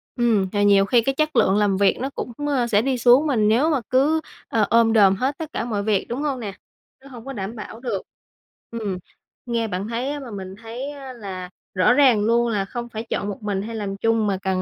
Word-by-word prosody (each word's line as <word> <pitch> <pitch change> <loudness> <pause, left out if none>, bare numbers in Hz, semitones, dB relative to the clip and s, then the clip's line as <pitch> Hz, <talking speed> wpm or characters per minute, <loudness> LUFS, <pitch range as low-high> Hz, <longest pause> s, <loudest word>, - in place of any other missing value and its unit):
Ừm, 230 -6 +2
và 205 - 0
nhiều 200 -1 +5
khi 235 +3 +4
cái 270 +4 -1
chất 310 +1 0
lượng 190 - +4
làm 205 -2 +2
việc 200 0 +3
nó 265 - -2
cũng, 250 - -6 0.2
a, 260 -5 +1
sẽ 210 -2 +3
đi 265 0 0
xuống, 250 +5 +5
mà 280 - +1
nếu 220 +8 +3
mà 290 -6 +1
cứ, 295 +5 +3 0.3
a, 225 - 0
ôm 225 +2 +4
đồm 200 -3 +5
hết 260 +7 -1
tất 315 -1 -7
cả - - -2
mọi 210 -4 -2
việc, 205 -2 +1
đúng 245 +5 -3
hông 280 -4 -1
nè? 205 -4 -5 0.5
Nó - - -13
hông 240 -3 -11
có 270 - -6
đảm 205 0 -5
bảo 225 0 -8
được. 245 - -3 0.7
Ừm, 215 -5 -3 0.5
nghe 230 -2 -1
bạn 195 +1 -3
thấy 240 +4 -2
á 290 - -4
mà 260 -5 -9
mình 190 -1 -7
thấy 240 +5 -6
á 275 -3 -9
là 190 -6 -7 0.2
rõ 185 +6 +4
ràng 255 -6 +5
luôn 235 +1 +3
là 205 -3 0
không 240 +3 -6
phải 220 -1 -5
chọn 200 - -2
một 205 +1 -7
mình 200 -2 -1
hay 225 +3 -6
làm 200 -2 -4
chung, 225 0 +1
mà 195 -2 0
cần, 190 -1 0
230 Hz, 245 wpm, -22 LUFS, 205-255 Hz, 0.7 s, nhiều